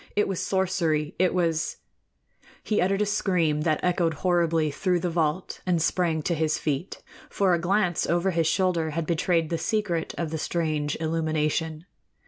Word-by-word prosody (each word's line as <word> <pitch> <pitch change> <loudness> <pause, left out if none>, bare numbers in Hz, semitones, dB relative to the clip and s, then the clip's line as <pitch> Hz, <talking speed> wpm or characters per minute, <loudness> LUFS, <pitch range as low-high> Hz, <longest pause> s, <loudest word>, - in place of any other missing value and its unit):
It 210 - +2
was 195 -3 -2
sorcery, 175 -6 0
it 185 -1 +3
was 165 -3 0 0.9
He 215 - +1
uttered 195 +3 +2
a - - 0
scream 180 -7 +1
that 155 -1 +1
echoed 175 -3 +1
horribly 165 -2 +1
through 180 +4 0
the 175 0 -2
vault 165 +2 -1
and 180 -2 +1
sprang 165 -1 0
to 170 - 0
his 155 -1 0
feet; 150 +3 -3 0.3
for 190 -3 +2
a 170 - +2
glance 180 -1 +1
over 175 +3 +1
his 165 -2 +1
shoulder 175 -3 +1
had 165 - 0
betrayed 165 0 +1
the 165 - 0
secret 200 -7 -1
of 165 -3 -2
the 160 - -3
strange 155 -3 -1
illumination. 160 0 -1
170 Hz, 165 wpm, -26 LUFS, 160-180 Hz, 0.9 s, it